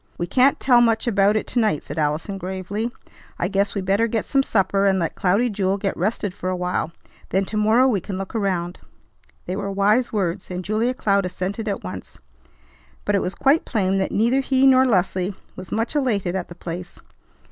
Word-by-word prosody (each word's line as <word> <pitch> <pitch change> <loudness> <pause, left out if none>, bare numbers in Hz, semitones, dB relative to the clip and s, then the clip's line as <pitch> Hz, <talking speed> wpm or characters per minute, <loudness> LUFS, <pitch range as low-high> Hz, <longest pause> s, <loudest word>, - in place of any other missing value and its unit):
"We 175 - -1
can't 255 +9 +3
tell 245 -2 +5
much 225 -1 +2
about 205 -2 +3
it 215 - 0
to 245 - -1
night," 215 -10 +1
said - - -6
Allison 155 +6 -1
gravely. 190 +4 -3 0.5
"I 175 - 0
guess 200 +2 0
we 200 - -1
better 200 +4 +2
get 225 -1 -2
some 275 - +2
supper 195 -4 +1
and 190 -1 +3
let 165 -3 -1
Cloudy 200 +7 +2
Jewel 195 -3 0
get 195 -1 -2
rested 200 +1 -1
for 185 -2 -4
a 185 - -1
while. 180 -2 -2 0.4
Then 195 +1 +1
to 215 - -6
morrow 220 +5 +4
we 210 -8 +1
can 195 0 -5
look 195 -1 -6
around." 185 -5 -2 0.7
They 180 - -3
were 200 0 -3
wise 210 +5 +2
words, 190 -3 -2
and 180 0 -5
Julia 225 +5 0
Cloud 200 -5 +1
assented 195 +4 -4
at 200 - -3
once; 90 - -8 0.9
but 205 - +1
it 200 - +2
was 185 - -3
quite 280 +4 +3
plain 195 -4 0
that 190 - -1
neither 235 +6 +2
he 265 0 +2
nor 260 -1 +6
Leslie 190 -2 0 0.2
was 185 -1 -10
much 225 +7 -1
elated 210 -10 0
at 185 -2 -3
the 175 - -10
place. 175 +1 -7
200 Hz, 205 wpm, -22 LUFS, 185-225 Hz, 0.9 s, nor